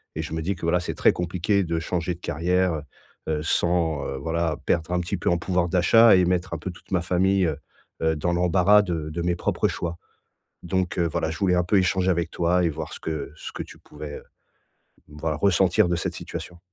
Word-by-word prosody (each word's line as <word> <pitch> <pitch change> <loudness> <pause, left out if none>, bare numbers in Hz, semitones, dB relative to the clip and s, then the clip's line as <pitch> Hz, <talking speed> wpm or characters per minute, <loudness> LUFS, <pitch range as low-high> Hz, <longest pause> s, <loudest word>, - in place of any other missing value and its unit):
et 80 - -2
je 80 - -6
me 80 - -2
dis 95 +4 -1
que, 85 - -15
voilà, 85 +1 +2
c'est - - -4
très - - +4
compliqué 90 +3 0
de 85 -1 -1
changer 85 +1 -2
de - - -18
carrière, 90 +3 +1
heu 75 - -4 0.5
heu, 75 -1 -1
sans, 80 -3 +1
heu, 70 - -4
voilà, 80 +1 -1
perdre 85 0 0
un 90 - +2
petit 85 +3 -3
peu 85 - -1
en 85 - +2
pouvoir 90 0 0
d'achat 110 +5 +6
et 90 - +4
mettre 90 0 0
un - - -2
peu 95 - -5
toute 85 - -17
ma 90 -2 +2
famille, 95 +1 +2
heu 75 - -2 0.5
heu, 80 0 +2
dans 85 +3 0
l'embarras 90 +4 +4
de 80 -5 -3
de 85 +2 -3
mes 90 0 +1
propres - - 0
choix 85 0 -4 0.7
donc 95 +1 -1
heu, 85 - +2
voilà, 80 - -1
je 80 - -6
voulais 95 -2 +2
un 90 - +3
peu 100 - +2
échanger 95 0 +2
avec 85 -2 0
toi 90 +1 +1
et 85 - +2
voir 80 0 -6
ce - - -8
que 80 -2 -4
ce - - -8
que - - -5
tu - - -12
pouvais, 75 -1 -9
heu, - - -16 0.9
voilà, 75 +1 -3
ressentir 95 +1 +3
de 85 - +1
cette - - -3
situation. 90 - -7
85 Hz, 235 wpm, -24 LUFS, 80-90 Hz, 0.9 s, d'achat